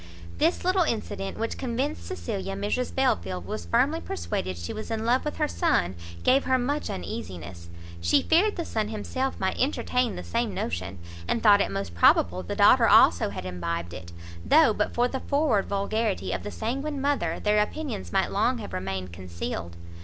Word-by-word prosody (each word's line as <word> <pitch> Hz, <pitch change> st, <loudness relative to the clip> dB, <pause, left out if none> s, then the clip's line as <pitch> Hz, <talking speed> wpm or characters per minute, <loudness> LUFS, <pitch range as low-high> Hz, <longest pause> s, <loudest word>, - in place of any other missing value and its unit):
This 335 Hz, +2 st, +1 dB
little 370 Hz, +1 st, +3 dB
incident, 215 Hz, -, -2 dB
which 225 Hz, +1 st, -3 dB
convinced 265 Hz, +4 st, -2 dB
Cecilia 200 Hz, -, -4 dB
Mrs 205 Hz, +5 st, -2 dB
Belfield 90 Hz, -, 0 dB
was 85 Hz, -2 st, -5 dB
firmly 85 Hz, -, +2 dB
persuaded 85 Hz, +2 st, -3 dB
she 85 Hz, 0 st, -5 dB
was 215 Hz, -, -6 dB
in 225 Hz, -1 st, -2 dB
love 245 Hz, +3 st, +2 dB
with 300 Hz, -, -3 dB
her -, -, +1 dB
son, 85 Hz, +1 st, +1 dB, 0.3 s
gave 265 Hz, +2 st, +4 dB
her 260 Hz, 0 st, +3 dB
much 285 Hz, +4 st, -1 dB
uneasiness; 85 Hz, -1 st, -6 dB, 0.3 s
she 85 Hz, 0 st, +3 dB
feared 385 Hz, +6 st, +3 dB
the 340 Hz, -, -3 dB
son 215 Hz, -2 st, -1 dB
himself 255 Hz, +5 st, -3 dB
might 190 Hz, -, -1 dB
entertain 250 Hz, -3 st, 0 dB
the -, -, -6 dB
same 85 Hz, -, -2 dB
notion, 90 Hz, +3 st, -3 dB, 0.3 s
and 235 Hz, -, 0 dB
thought 205 Hz, -2 st, +7 dB
it -, -, 0 dB
most 100 Hz, -3 st, -4 dB
probable 90 Hz, +1 st, +4 dB
the 85 Hz, -, -5 dB
daughter -, -, +6 dB
also 85 Hz, +3 st, +6 dB
had 100 Hz, -2 st, -6 dB
imbibed 85 Hz, -1 st, -4 dB
it, 85 Hz, +1 st, -9 dB, 0.3 s
though 310 Hz, -8 st, +5 dB
but -, -, -1 dB
for 245 Hz, +1 st, +3 dB
the 265 Hz, +1 st, -4 dB
forward 280 Hz, -9 st, +1 dB
vulgarity 200 Hz, -, -1 dB
of 95 Hz, 0 st, -2 dB
the -, -, -5 dB
sanguine 275 Hz, +6 st, -3 dB
mother, 270 Hz, -, 0 dB
their 210 Hz, 0 st, +2 dB
opinions 210 Hz, -, -4 dB
might -, -, +1 dB
long -, -, +1 dB
have 90 Hz, -, -7 dB
remained 95 Hz, -1 st, -4 dB
concealed. 85 Hz, -1 st, -5 dB
200 Hz, 180 wpm, -26 LUFS, -, 0.3 s, thought